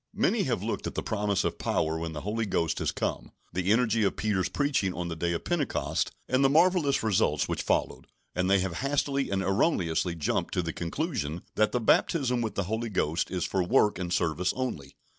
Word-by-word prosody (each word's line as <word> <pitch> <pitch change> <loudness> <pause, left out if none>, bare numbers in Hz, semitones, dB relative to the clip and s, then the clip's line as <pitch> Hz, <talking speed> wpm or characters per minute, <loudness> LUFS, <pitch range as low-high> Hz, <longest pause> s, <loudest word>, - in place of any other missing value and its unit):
Many - - +2
have - - -1
looked - - -2
at - - -6
the - - -2
promise 105 -2 0
of - - -2
power 80 0 0
when 80 -1 -4
the 75 - -5
Holy 110 +3 -2
Ghost 85 -4 0
is - - 0
come, - - -3 0.2
the 90 +2 0
energy 115 -1 +3
of 100 - +1
Peter's 95 -3 0
preaching 120 -6 0
on 85 0 -3
the 85 - -4
day 85 +1 -1
of 85 - -3
Pentecost, 165 -6 -1 0.2
and 130 +2 +2
the 135 - +5
marvellous 160 -3 +3
results 110 -4 +2
which - - -2
followed, - - -1 0.3
and 90 +1 0
they 100 - +5
have 90 -2 -3
hastily 140 0 0
and 95 0 0
erroneously 90 - +1
jumped 80 - -1
to 90 - +1
the 85 -1 -3
conclusion 85 - -3
that 110 0 +2
the 125 - 0
baptism 125 +1 +2
with 110 -2 -3
the 100 - 0
Holy 110 +5 -2
Ghost 85 -4 0
is 90 -3 -2
for 95 - 0
work 95 +2 +3
and 90 -1 -3
service 90 0 +1
only. 100 - -4
100 Hz, 210 wpm, -28 LUFS, 85-125 Hz, 0.3 s, the